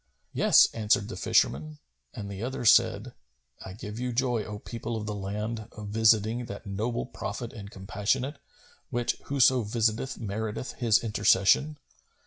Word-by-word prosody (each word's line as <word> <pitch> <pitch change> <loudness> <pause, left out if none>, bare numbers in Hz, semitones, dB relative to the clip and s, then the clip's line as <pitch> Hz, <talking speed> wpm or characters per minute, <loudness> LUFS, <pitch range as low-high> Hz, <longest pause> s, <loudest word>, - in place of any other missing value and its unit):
"Yes," - - +6
answered 110 -1 +1
the - - -6
fisherman, 75 +4 +1 0.4
and 100 - -6
the 100 0 -7
other 125 +1 -4
said, - - +4 0.5
"I 95 - -8
give 105 +1 -7
you 125 0 -2
joy, 120 -2 0
O 105 -1 -6
people 115 +1 -5
of 105 - -5
the 105 - -3
land, 105 +3 -4
of 105 -1 -8
visiting[FN#257] 110 +2 +2
that 100 +2 -8
noble 105 - -2
Prophet - - -6
and 100 -1 -9
compassionate, 105 +9 -2 0.5
which 120 0 -1
whoso 130 -2 +4
visiteth 115 +4 -1
meriteth 110 +2 -4
his 115 -3 +2
intercession! 110 +7 +3
110 Hz, 145 wpm, -28 LUFS, 105-120 Hz, 0.5 s, Yes